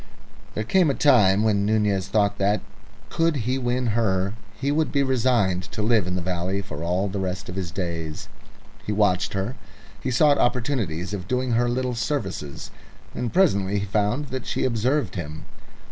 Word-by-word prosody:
There 110 - -1
came 175 - +3
a 135 - +1
time 105 -8 +5
when 105 -2 +2
Nunez 105 -2 +1
thought 100 0 +1
that, 100 +2 +2 0.5
could 165 -1 +2
he 130 +2 0
win 125 0 0
her, 100 -4 +1 0.3
he 140 +1 0
would 155 +1 +1
be 140 -2 +2
resigned 120 -8 +2
to 105 - -2
live 110 -4 +3
in 90 - -2
the 90 - -2
valley 90 +2 -2
for 80 -6 -7
all 90 +4 0
the 100 0 -3
rest 95 0 -3
of 90 - -5
his 95 -3 -3
days. 85 -4 -4 0.6
He - - -3
watched 105 -3 +2
her; 100 +5 -2 0.5
he - - -2
sought 145 +3 +4
opportunities 110 - 0
of 95 -3 -5
doing 125 +1 0
her 120 +1 +2
little 125 +1 -1
services, 110 - -3 0.4
and 120 - -3
presently 100 - +2
he 100 - -1
found 105 +8 0
that 130 -1 -5
she - - -1
observed 125 -2 0
him. 80 -3 -6
105 Hz, 175 wpm, -24 LUFS, 95-125 Hz, 0.6 s, time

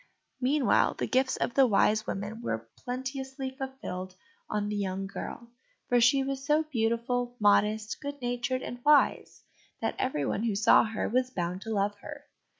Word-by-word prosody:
Meanwhile 270 +1 +3
the - - -2
gifts 260 +1 +1
of - - -1
the 270 -2 +5
Wise 215 0 +2
Women 205 +4 -4
were 115 - -3 0.2
plenteously 265 +1 -4
fulfilled 260 -9 -6 0.3
on 210 -1 -1
the 210 - -2
young 195 -1 -2
girl, 235 +4 -7 0.4
for 245 -1 +4
she 270 +3 +5
was 270 0 -3
so 300 +2 +3
beautiful, 245 -2 -1
modest, 210 +1 +2
good 285 -1 -5
natured, 245 +1 -2
and 245 0 -7
wise, 295 -1 +3 0.4
that - - -1
everyone 195 - -1
who 220 -3 0
saw 210 +3 +5
her 220 0 -2
was 255 +2 +1
bound 180 -4 -3
to 225 - -7
love 205 +1 0
her. 290 +4 -9
245 Hz, 160 wpm, -29 LUFS, 205-265 Hz, 0.4 s, the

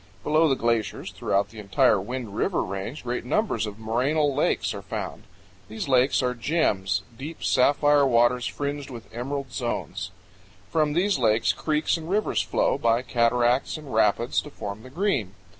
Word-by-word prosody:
Below 155 +1 +3
the 135 - +3
glaciers 115 -3 -1
throughout 100 0 0
the 110 - -11
entire 100 -1 +3
Wind 115 -1 -5
River - - 0
Range 100 +9 -5
great 125 -1 -3
numbers 205 - 0
of 105 - -6
morainal 130 +6 +1
lakes 145 - +1
are 100 - -6
found. 100 - -6 0.4
These 110 +6 -5
lakes 130 0 +3
are 125 0 +1
gems 115 - 0
deep 150 +7 -8
sapphire 145 +2 +4
waters 120 0 +3
fringed 145 0 -4
with 115 -4 -10
emerald 135 +2 -4
zones. 120 -2 -3 0.6
From 155 -2 +2
these 180 +1 +1
lakes 110 -2 +3
creeks 155 +1 0
and 165 0 -8
rivers 210 +3 +1
flow, - - 0
by 115 +1 +2
cataracts 120 +3 +2
and 150 -5 -9
rapids, 110 +3 +2
to - - -10
form 105 -6 -7
the 130 - -12
Green. 135 - -1
125 Hz, 160 wpm, -25 LUFS, 110-145 Hz, 0.6 s, sapphire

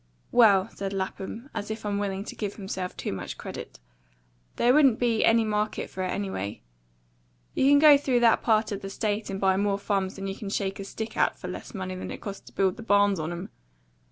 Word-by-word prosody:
Well," 205 -6 +6
said 195 0 -5
Lapham, 195 +6 -5
as 205 - -4
if 220 0 -5
unwilling 200 -1 -2
to - - -8
give 205 -2 -4
himself 190 -2 -5
too - - -3
much 95 - -6
credit, - - -8 0.8
"there 245 +1 +4
wouldn't 270 -6 +5
been 235 -3 +1
any 225 0 +4
market 210 0 -2
for 190 - -5
it, 185 - 0
anyway. 180 - -4 0.9
You 270 - +3
can 285 - +7
go 290 -1 +8
through 255 -4 +1
that 230 -2 +5
part 220 -1 +2
of 200 - -4
the 195 - -6
State 210 +1 -2
and 195 0 -3
buy 190 -1 +3
more 200 0 +1
farms 195 -2 -1
than 195 - -6
you 195 - -2
can 205 -1 -6
shake 195 -1 -2
a 195 - -5
stick 220 +2 -6
at - - +2
for - - -7
less - - -8
money 185 -1 -4
than 185 - -6
it - - -6
cost 200 -2 -8
to - - -14
build 190 -2 +1
the - - -8
barns 205 -3 +3
on 155 +2 -3
'em. 175 +3 -6
200 Hz, 220 wpm, -27 LUFS, 195-220 Hz, 0.9 s, go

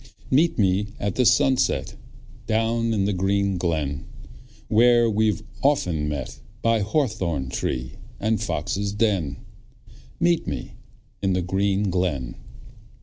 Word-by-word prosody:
Meet 155 +6 +3
me 100 0 +2
at 100 -1 -1
the 125 -2 +3
sunset 125 +3 +2 0.5
Down 115 +1 +1
in 100 -3 +1
the 100 - +1
green 95 0 0
glen, 75 -5 -1 0.6
Where 120 +1 +5
we've 110 0 +1 0.2
often 90 - +1
met 70 -4 -5 0.2
By 115 -1 +3
hawthorn 100 - -1
tree 60 -1 -3 0.2
and 110 +1 0
foxes' 100 +1 -2
den, 100 -9 0 0.8
Meet 170 0 +2
me - - -4 0.5
in 95 -1 +1
the 90 -1 0
green 95 +2 0
glen. 80 -9 -1
100 Hz, 120 wpm, -24 LUFS, 90-115 Hz, 0.8 s, Where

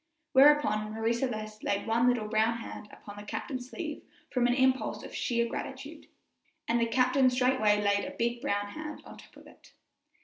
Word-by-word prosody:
Whereupon 265 -7 +4
Marie 225 +1 0
Celeste 215 -3 -4
laid 200 0 -1
one 230 +2 +2
little 245 -4 +1
brown 220 +1 +1
hand 225 -2 -9
upon 205 0 -12
the 205 - -8
captain's 255 +3 -5
sleeve 310 0 -6 0.3
from 245 -2 +2
an 245 - +2
impulse 260 0 +1
of - - -10
sheer 235 -2 0
gratitude, - - -7 0.6
and 235 0 +2
the 230 - +2
captain 255 +2 +3
straightway 250 -5 +2
laid 200 -1 +1
a - - -7
big 235 +1 -1
brown 205 -7 -1
hand 305 +5 -7
atop - - -14
of - - -15
it. - - -19
235 Hz, 175 wpm, -29 LUFS, 215-255 Hz, 0.6 s, Whereupon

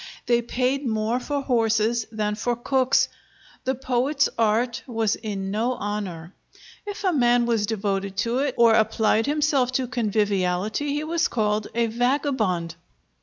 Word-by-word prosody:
They 240 -1 +3
paid 255 +3 -1
more 220 +2 0
for 285 +2 -3
horses 225 -2 +1
than 210 -1 -1
for 240 +3 -1
cooks. 260 +2 +2 0.6
The 265 +1 0
poet's 265 +3 +1
art 230 +2 +1
was 225 -3 0
in 195 -3 -4
no 230 +5 0
honor. 195 -6 -5 0.5
If 410 +1 -6
a 375 -2 +2
man 240 -3 +3
was 225 -3 +1
devoted 200 -2 -2
to 235 +2 0
it, 275 -2 -1
or 235 -1 +6
applied 220 +1 +2
himself 290 -4 +1
to 255 0 0
conviviality, 210 +1 0
he 295 - -2
was 335 +2 0
called 210 -2 0
a 235 0 +2
vagabond!" 230 - 0
235 Hz, 145 wpm, -24 LUFS, 210-255 Hz, 0.6 s, or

